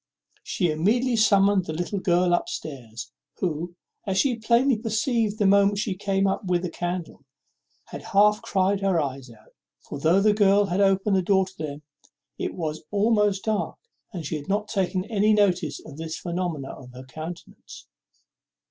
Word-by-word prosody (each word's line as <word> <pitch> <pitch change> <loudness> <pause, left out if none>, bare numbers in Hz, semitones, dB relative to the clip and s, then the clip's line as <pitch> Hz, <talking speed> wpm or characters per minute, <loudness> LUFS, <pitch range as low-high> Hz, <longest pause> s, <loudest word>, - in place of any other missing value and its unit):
She 175 -4 -1
immediately 230 +11 +1
summoned 200 -3 +3
her 155 - -3
little 175 +5 -3
girl 175 -1 +2
up 175 - 0
stairs, 120 -7 -7 0.3
who, 170 0 -3 0.3
as 190 -1 0
she 245 +5 +2
plainly 240 +4 +3
perceived 220 0 -1
the 210 - +1
moment 200 +1 +4
she 205 -1 -1
came 195 0 0
up 195 +2 0
with 180 -1 0
a 175 - -4
candle, 175 -4 -5 0.6
had - - -9
half 210 +2 +3
cried 195 -3 +1
her 195 -3 +1
eyes 135 -3 -4
out; 110 -2 -19 0.3
for, 145 - -6
though 165 +6 +3
the 210 +1 +4
girl 205 -1 +4
had 190 +1 0
opened 195 +1 +3
the - - +2
door 190 +1 +2
to 190 0 -14
them, 150 -3 -6 0.2
as - - -27 0.3
it - - -3
was 155 -3 -4
almost 210 -1 +2
dark, 215 -2 -1 0.5
she 155 +1 -3
had 145 +5 -10
not 210 +2 -1
taken 190 -2 -1
any 215 -1 +2
notice 180 -8 +1
of 150 -3 -11
this 160 0 -5
phenomenon 170 -7 -4
in - - -13
her 130 - -10
countenance. 160 +5 -10
190 Hz, 175 wpm, -25 LUFS, 165-205 Hz, 0.6 s, moment